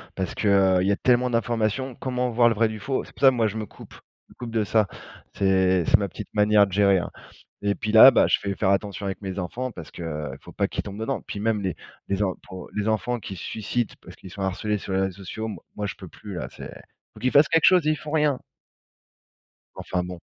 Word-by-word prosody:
parce 95 -2 -3
que, 105 - -2
heu, 95 -2 +4
il 95 - 0
y - - +3
a - - +3
tellement 125 +3 +2
d'informations. 115 +2 -1
Comment 125 -1 -2
voir 120 +1 +4
le 115 - 0
vrai 115 +1 +3
du 110 0 -6
faux? 130 +6 -2
C'est - - -14
pour - - -17
ça 135 - +8
que 130 - -1
moi, 115 -2 +2
je 110 +1 -5
me 110 - -3
coupe - - -15 0.4
me - - -18
coupe 120 -2 -7
de 110 -1 +1
ça, 105 -1 +2 0.5
c'est 95 -2 +2
c'est - - +5
ma 100 - -2
petite 100 +3 -9
manière 105 -1 +4
de - - -11
gérer, 100 0 +4
hein - - -5 0.5
et 100 0 +1
puis, 110 - -3
là, 110 +4 +10
ben, - - +4
je - - +3
vais 100 - -1
faire 95 - +1
attention 100 0 -1
avec 95 +1 -4
mes 95 -1 -5
enfants 120 +8 -4
parce 85 -7 -10
que, - - -10
heu, 75 -2 -4
faut - - -13
pas - - 0
qu'ils - - -3
tombent 100 +1 -8
dedans. 120 -1 -2
Puis 100 - -5
même, 110 -1 0
les 95 -4 -2 0.3
les 100 +1 0
en 95 -2 -1
pou 95 -1 -9
les 105 +1 -1
enfants 110 +3 0
qui 100 - -7
se 85 - -8
suicident 110 +2 -2
parce - - -13
qu'ils 95 - -13
sont 100 - -8
harcelés 105 +3 -1
sur 95 - -5
les 95 - +2
réseaux 95 -1 -2
sociaux, 110 +5 -5
moi 105 - -8
moi, 105 - -3
je - - -5
peux 95 - -11
plus, 100 +2 -10
là. 85 - -4
C'est - - -9 0.4
faut - - -14
qu'ils 130 - 0
fassent 145 +2 +5
quelque 165 - +4
chose 180 -4 +5
et - - +4
ils - - +1
font 150 - -8
rien! 150 -4 +2 1.4
Enfin 90 -1 -2
bon. 90 -1 -7
105 Hz, 265 wpm, -24 LUFS, 95-120 Hz, 1.4 s, là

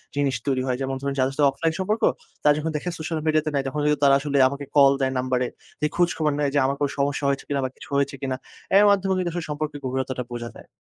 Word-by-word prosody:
জিনিস 140 -2 +1
তৈরি 130 -2 +1
হয়। 125 -1 0
যেমন 135 0 -2
ধরুন 140 0 -2
যাদের 130 +1 +1
সাথে 145 - +3
অফলাইন 160 +4 -1
সম্পর্ক, 210 +4 -1 0.4
তারা 150 - +6
যখন 160 +1 -2
দেখে 180 - -4
সোশ্যাল 160 0 -3
মিডিয়াতে 155 0 +2
নাই, 140 - +1
তখন 150 +3 -3
কিন্তু 150 0 +2
তারা 140 -1 +6
আসলে 140 0 -1
আমাকে 140 +1 -5
কল 140 -1 +8
দেয় 130 0 +1
নাম্বারে। 125 0 0 0.3
দিয়ে 150 - +3
খোঁজখবর 165 -3 +1
নেয় 145 -2 +1
যে 145 - +3
আমার 135 +1 0
কোনো 145 -1 +1
সমস্যা 140 0 0
হয়েছে 140 0 -1
কিনা 140 -1 0
বা - - -2
কিছু - - -13
হয়েছে 140 0 0
কিনা? 135 -2 -1 0.4
অ্যার 200 +2 +6
মাধ্যমে 195 -1 +2
কিন্তু 180 -2 0
আসলে 175 -1 -3
সম্পর্কের 150 0 -3
গভীরতাটা 130 0 -2
বোঝা 120 0 -5
যায়। - - -14
140 Hz, 245 wpm, -24 LUFS, 135-155 Hz, 0.4 s, কল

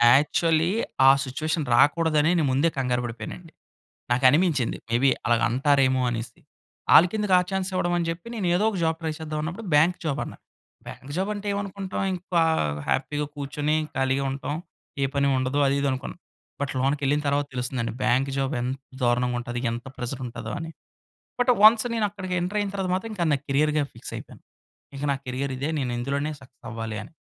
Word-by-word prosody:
Actually 160 +3 +2 0.4
ఆ - - +10
situation 155 +4 -2
రాకూడదనే. 155 +2 +4
నేను 155 - +2
ముందే 140 +6 +3
కంగారు 125 -2 0
బడిపోయానండి. 120 +9 -7 0.6
నాకనిపించింది 135 +2 +3
మేబి 120 +4 +3 0.2
అలాగంటారేమో 130 +4 +3
అనేసి. 115 0 -5 0.5
ఆళ్ళకెందుకు 195 +3 +5
ఆ - - +4
చాన్స్ 190 0 -1
ఇవ్వడం 175 -1 0
అని 175 - 0
జెప్పి. 165 +5 -5
నేను 210 -5 -2
ఏదో 205 - +1
ఒక 210 - -5
జాబ్ 160 0 +1
ట్రై 160 -1 -2
చేద్దాం 155 -1 -4
అన్నప్పుడు. 175 +8 -5
బ్యాంక్ 165 +5 +5
జాబ్ 150 -2 -1
అన్నా. - - -9 0.5
బ్యాంక్ 135 - -10
జాబ్ 190 +3 -1
అంటే, 205 0 -7
ఏమనుకుంటాం 195 -1 -4
ఇంకా 180 -1 -1 0.5
హ్యాపీగా 150 +2 0
కూర్చొని, 145 +2 -1 0.2
ఖాళీగా 135 +1 +1
ఉంటాం, 140 +2 -4 0.5
ఏ - - +4
పని 140 0 +2
ఉండదు, 130 +2 -1
అది, 135 - +2
ఇది 140 - +1
అనుకున్నాం. 130 +5 -5 0.4
బట్, 145 - -2
లోనకెళ్ళిన 140 +2 +1
తరువాత 145 0 +1
తెలుస్తుందండి. 125 -1 -2
బ్యాంక్ 125 +2 +2
జాబ్ 135 +1 -1
ఎంత 130 +2 -2 0.2
దారుణంగా 125 0 +2
ఉంటది. 120 0 -4
ఎంత 120 +3 -5
ప్రెజర్ 125 +2 -5
ఉంటదో 115 -2 -6
అని. 165 0 -6 0.7
బట్, 245 +1 +4
వన్స్ 220 +1 +8
నేను 220 -2 +1
అక్కడికి 185 -2 -5
ఎంటర్ 180 +4 -1
అయిన 205 -1 -1
తర్వాత 190 -2 -2
మాత్రం. 195 +5 -3
ఇంకా 175 -4 -1
నా 140 - +2
క్యారియర్‌గా 150 +2 +2
ఫిక్స్ - - -9
అయిపోయాను. - - -11 0.5
ఇంక 140 +1 -5
నా - - -1
కేరియర్ 130 +2 -2
ఇదే. 140 +3 -2
నేను 130 -3 -1
ఇందులోనే 140 +4 -1
సక్సెస్ 130 -1 -17
అవ్వాలి 110 -1 -5
అని. 135 - -13
145 Hz, 170 wpm, -25 LUFS, 130-170 Hz, 0.7 s, ఆ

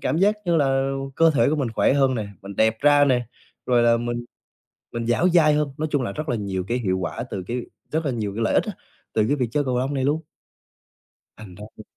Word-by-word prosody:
cảm 160 - 0
giác 205 +3 +4
như 170 -2 +2
là 135 -2 +2 0.3
cơ 165 0 +5
thể 145 - +3
của 155 - +1
mình 135 -5 -1
khỏe 115 - +3
hơn 135 -2 +3
nè, 110 -3 -3 0.2
mình 100 0 -9
đẹp 110 0 +3
ra 145 0 +5
nè, 125 -4 +1 0.4
rồi 120 -1 +3
là 115 0 +4
mình 120 0 -3 0.7
mình 115 -1 -3
dẻo 120 +10 +2
dai 160 -4 +4
hơn. 150 -1 +1
Nói 155 - -1
chung 145 -3 +1
là 100 - -3
rất 155 +4 -5
là 120 - 0
nhiều 95 -3 -3
cái 120 +2 0
hiệu 95 -5 -1
quả 105 +5 -4
từ 95 -2 -4
cái 125 +1 -2 0.3
rất 160 +1 -1
là - - +1
nhiều 105 -4 -3
cái 115 - -2
lợi - - +1
ích - - +3
á, - - -4 0.4
từ 110 - +2
cái 145 - +2
việc 125 -4 -1
chơi 145 -1 +1
cầu 125 -1 0
lông 135 +3 -1
này 130 -1 -1
luôn. 150 +3 +1 1.2
Thành 95 -5 -11
ra 105 - -9
thì 110 - -10
125 Hz, 255 wpm, -23 LUFS, 115-145 Hz, 1.2 s, cơ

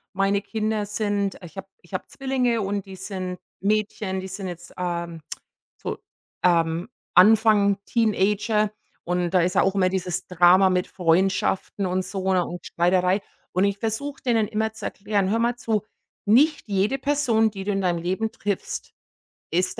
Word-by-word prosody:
meine 195 +1 +1
Kinder 215 -1 -1
sind 205 -1 -1
ich 175 +2 -12
habe 195 0 -6
ich 175 - -21
habe - - -3
Zwillinge, 255 -4 0
und 200 0 -2
die 190 -1 -9
sind 185 -1 -5 0.2
Mädchen, 205 -1 0
die 190 - -6
sind 190 0 -5
jetzt, 175 0 -8
ähm, 170 -2 -3 0.6
so, - - -3 0.5
ähm, 170 0 +2 0.3
Anfang 210 +1 +5
Teenager, 210 -1 +1 0.3
und 175 0 0
da 185 0 +3
ist 180 +1 +1
ja - - +4
auch 195 0 +1
immer 185 -2 +3
dieses 180 -1 -2
Drama 180 +2 +5
mit 180 -1 +1
Freundschaften 190 +2 +1
und 185 +1 0
so, 190 -1 -2
ne, 185 -2 +3
und 175 0 -7
Streiterei. 180 +3 +2 0.3
Und 185 +2 +2
ich 200 0 0
versuche, 230 +6 -3
denen 225 -5 +2
immer 220 0 -1
zu - - -9
erklären: 200 -2 -1
„Hör 225 - +2
mal 235 +1 +1
zu, 220 -4 -1 0.4
nicht 285 +9 +5
jede 205 +7 +1
Person, 255 -6 +2
die 195 -2 -7
du 205 - 0
in 195 - 0
deinem 180 -2 +1
Leben 190 +6 -1
triffst, 205 -3 -4 0.6
ist 180 +3 0
195 Hz, 165 wpm, -24 LUFS, 180-215 Hz, 0.6 s, Anfang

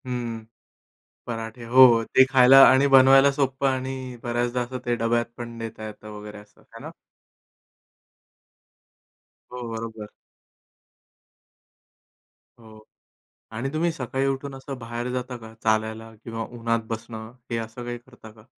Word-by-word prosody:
हं, 120 -3 -5 0.8
पराठे 115 0 -6
हो, 130 +3 +7
हो. 115 -2 +4
ते 130 - +5
खायला 135 0 +7
आणि 135 +2 +5
बनवायला 135 +1 +7
सोप्पं 135 -1 0
आणि 130 -1 -4
बऱ्याचदा 120 +1 -1
असं 125 +1 -5
ते 120 0 +1
डब्यात 120 +1 0
पण 120 -1 -6
नेता 115 -1 -7
येतं 105 0 -11
वगैरे, 105 0 -10
असं 105 0 -20
आहे - - -15
ना? - - -7 2.6
हो, 125 - -6
बरोबर. 110 -2 -7 2.5
हो 110 -1 -15 0.8
आणि 130 +5 -4
तुम्ही 165 +2 0
सकाळी 135 -1 -3
उठून 135 0 -3
असं 135 0 -8
बाहेर 120 +1 -5
जाता 125 0 -4
का? 110 -2 -12
चालायला 110 +1 -1
किंवा 115 -1 -5
उन्हात 115 0 0
बसणं. 110 0 -7 0.2
हे 115 - -1
असं 115 +2 -7
काही 120 0 -5
करता 120 -2 -16
का? 110 0 -19
120 Hz, 130 wpm, -24 LUFS, 115-130 Hz, 2.6 s, हो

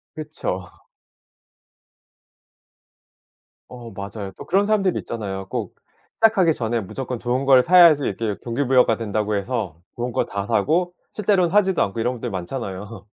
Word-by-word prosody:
그쵸. 150 - -5 3.0
어 120 -2 -10
맞아요. 100 0 -7
또 - - -9
그런 195 +3 +2
사람들이 200 -4 +1
있잖아요. 95 -4 -5
꼭 115 -7 -4 0.4
시작하기 200 -8 +4
전에 115 -2 -1
무조건 125 +5 -5
좋은 125 +3 -1
걸 130 -2 +6
사야지 170 -4 +7
이렇게 110 -3 -2
동기부여가 125 -1 +2
된다고 105 -1 -1
해서 100 -6 -3
좋은 120 +1 -3
거 - - 0
다 100 0 -4
사고, 175 - +1 0.2
실제로는 190 -4 +2
하지도 190 -3 +3
않고 100 +3 -4
이런 120 +3 0
분들 120 +1 -5
많잖아요. 100 +2 -6
120 Hz, 315 characters per minute, -22 LUFS, 105-160 Hz, 3.0 s, 사야지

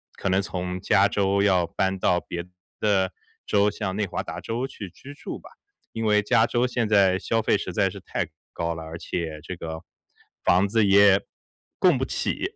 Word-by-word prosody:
可 100 - -2
能 95 +1 +3
从 90 -1 -4
加 100 +1 +3
州 100 0 +1
要 90 -4 +3
搬 95 +2 -1
到 90 -1 +2
别 85 0 -6 0.3
的 95 -3 +2 0.3
州， 105 0 +3
像 105 -2 -4
内 105 - +1
华 - - -4
达 - - -6
州 115 +3 -3
去 105 -8 -8
居 140 +10 -12
住 145 - -7
吧。 - - -14 0.4
因 115 0 -3
为 105 -1 +4
加 110 +2 +3
州 120 +1 +1
现 125 -3 -1
在 95 -3 +4
消 115 0 0
费 - - +2
实 - - -5
在 - - +2
是 - - -9
太 - - -3 0.2
高 85 0 -2
了， 80 0 -7
而 80 +1 -7
且 80 -2 -4
这 90 +2 -6
个 80 0 -6 0.6
房 90 +3 +4
子 105 +1 +2
也 100 0 +6 0.6
供 - - +4
不 - - -1
起， - - -2
95 Hz, 210 characters per minute, -25 LUFS, 90-105 Hz, 0.6 s, 也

